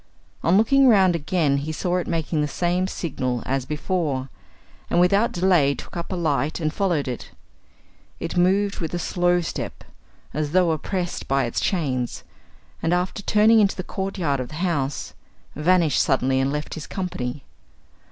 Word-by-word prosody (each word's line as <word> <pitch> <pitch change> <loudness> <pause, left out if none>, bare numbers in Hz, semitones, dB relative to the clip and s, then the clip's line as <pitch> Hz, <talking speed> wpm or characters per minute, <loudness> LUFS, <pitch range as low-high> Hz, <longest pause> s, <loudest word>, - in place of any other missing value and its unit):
On 175 +3 +4
looking 270 +5 +5
round 190 -6 +5
again, 155 -3 +1
he 145 +3 -3
saw 180 +3 -1
it 180 - -2
making 160 -2 -1
the 150 - 0
same 175 +4 0
signal 130 - -3
as 135 -1 -1
before, 150 -4 -2 0.6
and - - +2
without 200 +6 +3
delay 175 -6 +3
took - - -10
up 170 +2 -5
a - - -1
light 155 -2 0
and 155 -2 -1
followed 175 -8 0
it. 125 -2 -5 0.9
It 165 - -4
moved 195 +3 +2
with 165 0 -3
a - - 0
slow 175 0 +1
step, 165 - -5 0.5
as 150 +1 -2
though 180 -2 +4
oppressed 175 +3 -3
by 135 0 +2
its 120 - -2
chains, 135 - -1 0.6
and, 165 +2 +2
after 180 +3 -2
turning 215 +2 +5
into 200 -2 +3
the 185 - -4
courtyard 185 -8 -2
of 130 - -3
the 155 - -10
house, 145 -6 -2 0.4
vanished 170 0 +3
suddenly 130 -1 +2
and 135 +1 +1
left 150 +1 -4
his 155 - -7
company. 145 -9 -4
170 Hz, 165 wpm, -23 LUFS, 145-185 Hz, 0.9 s, looking